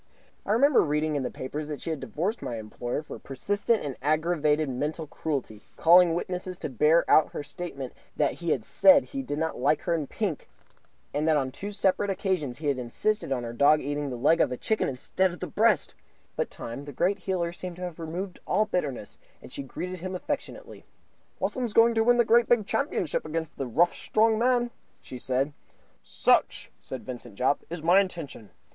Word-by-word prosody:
I - - 0
remembered 275 +1 +5
reading 150 +1 0
in 145 - 0
the 125 - -2
papers 145 +3 -5
that 150 -2 -5
she 165 - -4
had 155 - -3
divorced 160 - -3
my 120 - -4
employer 120 +6 -4
for - - -9
persistent 205 - -1
and 135 -3 -4
aggravated 155 0 +1
mental 150 +5 -3
cruelty, 140 -8 -4 0.2
calling 170 0 +6
witnesses 180 +1 -4
to - - -5
bear 150 +6 +3
out 155 - +4
her - - -4
statement 145 -4 -7 0.2
that 145 -2 +1
he 170 - -2
had 120 -7 0
said 285 -1 +6
he 275 - -5
did 145 - -4
not 160 +1 -2
like 145 +4 +2
her 170 - 0
in 155 -4 -1
pink, 190 -5 -3 0.6
and 150 +2 0
that 155 -1 +4
on 130 -2 -1
two 200 +9 -6
separate 200 0 +1
occasions 185 -9 -1
had 145 -4 -1
insisted 170 - -1
on 125 -2 0
her 115 0 -5
dog 145 +5 +5
eating 145 0 -3
the 125 - -4
leg 145 +7 +3
of 140 - +2
a 125 - -3
chicken 220 - 0
instead 165 +8 0
of 175 - -9
the - - -3
breast; 215 -6 +2 0.4
but - - -1
Time, 120 +5 -7
the 145 - -7
great 195 +8 +1
healer, 175 -2 -2
seemed 180 0 -7
to 180 - -8
have 175 -2 -6
removed 175 +4 -5
all 215 - +2
bitterness, 145 - -3 0.2
and - - -13
she - - -4
greeted 180 +7 -6
him 185 +2 -5
affectionately. 180 - -5 0.6
"Wassums 245 -5 -2
going 230 +1 +6
to 225 -1 +2
win 240 +1 +4
great 235 +1 +4
big 235 -4 +4
championship 200 - -1
against 160 0 -3
nasty 130 -3 -3
rough 175 +1 +4
strong 220 0 +2
man?" 245 0 +2 0.3
she 125 - -9
said. 130 +4 -1 0.5
"Such," - - +1
said 130 - -8
Vincent 125 -5 -8
Jopp, 130 +6 +1
"is 165 -1 -6
my 175 +4 +6
intention. 165 - -6
160 Hz, 195 wpm, -27 LUFS, 140-190 Hz, 0.6 s, calling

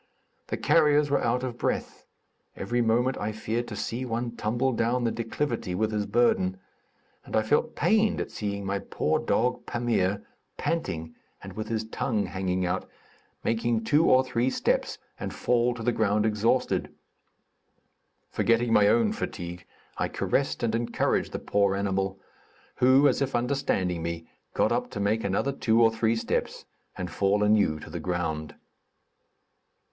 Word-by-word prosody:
The - - -3
carriers 150 -1 +3
were 140 - +2
out 125 +2 +1
of 120 -2 -4
breath; - - -3 0.5
every 120 +5 -1
moment 120 +3 +1
I 105 +1 -2
feared 110 +2 -3
to - - -6
see 120 +3 -3
one 120 -1 -2
tumble 120 +5 0
down 120 +2 0
the 115 - +1
declivity 115 -4 -2
with 110 +3 0
his 105 -1 -1
burden, 95 -6 +2 0.7
and - - -6
I 110 - +3
felt 130 +7 +1
pained 220 0 +2
at - - -4
seeing 100 -1 -4
my 100 +1 -1
poor - - -1
dog, 125 +2 0
Pamir, 105 -5 0 0.3
panting 95 - -2 0.3
and - - -8
with 110 0 -5
his 110 0 -1
tongue 110 -1 -1
hanging 95 -1 -1
out, 90 - -2 0.5
make 115 0 0 0.2
two 150 +7 +4
or 130 +1 +6
three 125 -1 0
steps - - 0 0.2
and - - -4
fall 120 0 +1
to 115 - -7
the 120 - +2
ground 105 -2 +1
exhausted. 110 +4 +1 1.4
Forgetting 115 0 +2
my 100 -2 +6
own 225 - +3
fatigue, 90 - -6 0.3
I - - +1
caressed 135 -3 -1
and 115 -1 +1
encouraged 115 +1 0
the - - -3
poor 100 -1 +1
animal, 95 -1 -1 0.6
who, 130 +3 +5
as - - +1
if 140 - 0
understanding 120 -9 0
me, 85 0 -4 0.3
got - - +2
up - - 0
to - - -4
make 105 +3 +1
another 100 +8 0
two 115 -4 +1
or 115 -1 +6
three 115 0 +1
steps 115 - -2 0.3
and 90 -2 -4
fall 100 +3 +1
anew 105 -7 +3
to - - -10
the - - -4
ground. 80 -4 -3
110 Hz, 160 wpm, -27 LUFS, 100-120 Hz, 1.4 s, or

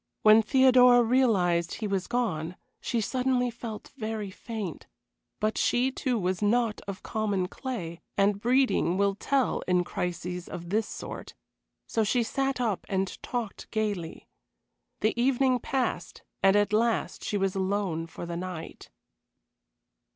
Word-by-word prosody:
When 215 +1 +8
Theodora 250 0 +6
realized 195 -9 +2
he 220 - -4
was 195 -2 -1
gone 180 -9 -1 0.2
she 235 - -1
suddenly 250 +1 0
felt 225 -2 -8
very 215 -5 -4
faint; 210 -5 -6 0.5
but 215 +1 0
she, 250 +2 +2
too, 255 -2 -1
was 185 -1 -1
not 225 +1 +1
of 195 -1 -6
common 205 -4 -1
clay, 180 -9 -6 0.2
and 200 0 +2
breeding 245 -7 +2
will 200 0 +2
tell 265 +6 0
in 180 -1 +3
crises 180 0 -4
of 175 -1 -7
this 215 +1 +1
sort, - - -7 0.5
so 225 - 0
she 235 +3 +2
sat 270 +2 -1
up 225 -6 0
and 190 -1 -2
talked 235 -5 -4
gayly. 205 -7 -3 0.7
The 215 - +2
evening 255 0 +3
passed, 245 -9 -2 0.2
and 195 +1 +5
at 205 0 +2
last 230 +1 +1
she 210 - -1
was 195 -1 0
alone 190 -4 -1
for 165 - -8
the 170 0 -5
night. 180 -2 -7
215 Hz, 140 wpm, -28 LUFS, 185-245 Hz, 0.7 s, When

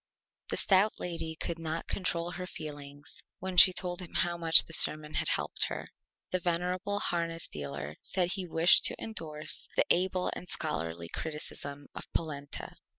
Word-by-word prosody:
The - - -1
Stout 195 +2 +3
Lady 165 -2 -3
could 165 +1 -4
not 165 0 -4
control 175 -2 -1
her 180 0 -6
Feelings 145 -3 -8
when 185 0 -5
she 185 - +10
told 180 0 -3
how 175 0 +2
much 165 -1 +7
the 165 - -8
Sermon 155 -1 +2
had - - +1
helped - - +1
her. - - -6 0.4
The 185 - 0
venerable 180 +4 -1
Harness 165 -2 -2
Dealer 70 0 -7
said 180 -2 -1
he 190 -2 -3
wished 165 +1 +6
to - - +3
indorse 155 -8 -2
the - - +3
Able 185 +1 +1
and 180 - -9
Scholarly 80 +2 -3
Criticism 145 - -5
of - - -10
Polenta. 145 -3 -5
165 Hz, 155 wpm, -30 LUFS, 150-180 Hz, 0.4 s, she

